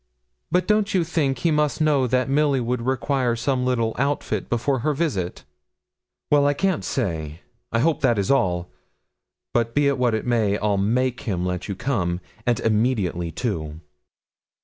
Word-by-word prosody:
'But 180 +1 +1
don't 210 -2 +2
you 180 - +3
think 150 -5 0
he 165 +7 +1
must 150 0 +1
know 145 -4 +3
that 130 +2 +1
Milly 140 0 +2
would 125 0 -1
require 130 -1 0
some 125 +1 0
little 115 -3 0
outfit 135 -7 -1
before 120 +3 0
her 150 +5 0
visit?' 105 - -2 0.9
'Well, 145 -1 +5
I 145 - +2
can't 190 +1 0
say. 80 - -3 0.3
I 115 - +1
hope 165 +3 +1
that 120 -5 +3
is 100 +3 +1
all; 90 -10 +1 0.8
but 115 -1 0
be 145 -1 +3
it 140 -2 +1
what 120 -3 +2
it 110 - -3
may, 110 -4 +1
I'll 105 -1 0
make 125 +6 0
him 90 -2 -1
let 90 -1 -3
you 100 - -3
come, 90 -8 -1 0.3
and 120 -3 +2
immediately, 105 -6 0
too.' 80 -7 -3
125 Hz, 170 wpm, -23 LUFS, 105-140 Hz, 0.9 s, Well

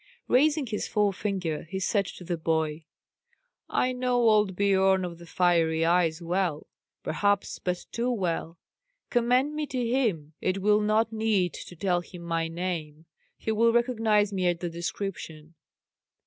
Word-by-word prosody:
Raising 295 +3 +3
his 215 -3 -3
forefinger, 195 -6 -1
he 190 - -3
said 200 0 +1
to 180 - -9
the 175 0 -2
boy, 160 -1 -1 0.8
"I 255 - +1
know 250 0 -1
old 210 -3 +3
Biorn 190 -1 +3
of 170 -1 -7
the 170 - -12
Fiery 165 -2 +2
Eyes 170 -1 +2
well; 175 -3 -1 0.4
perhaps 205 +4 0
but 180 -1 -3
too 235 +2 -1
well. 175 -7 -2 0.5
Commend 250 +4 +2
me 300 -1 -3
to 255 -3 -2
him. 210 - 0
It 185 +1 0
will 210 +1 +4
not 220 +2 +1
need 215 -6 +1
to 175 - -9
tell 175 0 0
him 175 0 -11
my 165 -1 -1
name; 165 -3 -4 0.3
he 220 - -3
will 230 +2 +4
recognize 225 -4 +2
me 185 -2 0
at 175 -1 +1
the 175 -1 -4
description." 165 -2 -5
190 Hz, 150 wpm, -27 LUFS, 170-220 Hz, 0.8 s, will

